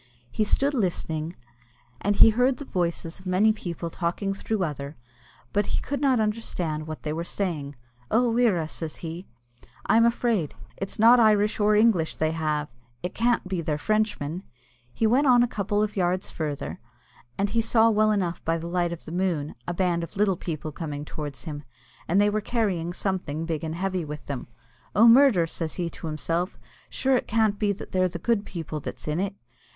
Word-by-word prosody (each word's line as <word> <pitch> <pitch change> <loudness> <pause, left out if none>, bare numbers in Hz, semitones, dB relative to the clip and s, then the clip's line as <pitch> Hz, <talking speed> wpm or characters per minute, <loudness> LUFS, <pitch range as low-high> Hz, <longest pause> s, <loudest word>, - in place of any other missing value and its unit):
He 215 - +1
stood 275 +7 +2
listening, 170 - -2 0.7
and 205 +1 +1
he 225 - +8
heard 250 +3 +2
the 285 - -7
voices 170 -5 -2
of 185 - -11
many 200 +4 +4
people 170 -5 -5
talking 185 +4 -2
through 200 0 -2
other, 145 -2 -4 0.6
but 205 - +1
he - - 0
could 280 -1 -3
not 265 -4 +3
understand 180 -8 -2
what 155 -1 -7
they 150 - -2
were 165 +2 -2
saying. 160 -7 -3 0.3
"Oh, 240 +1 +3
wirra!" 215 -10 +2
says 160 -1 -6
he, 165 +3 -6 0.6
"I'm 225 +3 +5
afraid. 230 - +1 0.2
It's 195 - -5
not 235 +3 +7
Irish 215 -1 +4
or 210 0 +4
English 210 -7 +3
they 155 0 0
have; 155 -2 -1 0.4
it 180 - -3
can't 235 -3 +1
be 185 -2 -2
they're 155 -2 -1
Frenchmen!" 205 -4 -1 0.5
He 225 - 0
went 260 +6 +4
on 245 -2 +6
a - - +2
couple 210 -2 0
of 210 -1 -3
yards 185 0 0
further, 150 -3 -4 0.6
and 200 0 0
he 230 +1 +2
saw 225 0 +4
well 215 0 +3
enough 185 -5 -1
by 165 +1 +1
the 165 - -6
light 175 0 0
of 170 - -7
the - - -8
moon 175 -5 -1
a 175 - -1
band 175 -2 +1
of 170 - -8
little 200 -2 +3
people 155 -2 -5
coming 150 -2 -5
towards 150 -2 -6
him, 150 -3 -6 0.4
and 185 +4 +3
they 205 - +5
were 215 +1 0
carrying 200 -8 -1
something 175 -5 -2
big 160 -2 -3
and 160 0 -3
heavy 185 0 -1
with 150 -1 -7
them. 140 -3 -5 0.5
"Oh, 220 +4 +7
murder!" 235 -7 +6
says 165 -1 -5
he 170 -2 -2
to - - -7
himself, 165 +4 -2 0.3
"sure 265 0 +1
it - - -1
can't 215 -2 +2
be 210 -2 +2
that 195 - -10
they're 185 0 +2
the 170 - -5
good 210 +3 0
people 160 -3 -5
that's - - -7
in 150 +2 0
it!" 195 +1 -2
185 Hz, 195 wpm, -26 LUFS, 160-215 Hz, 0.7 s, he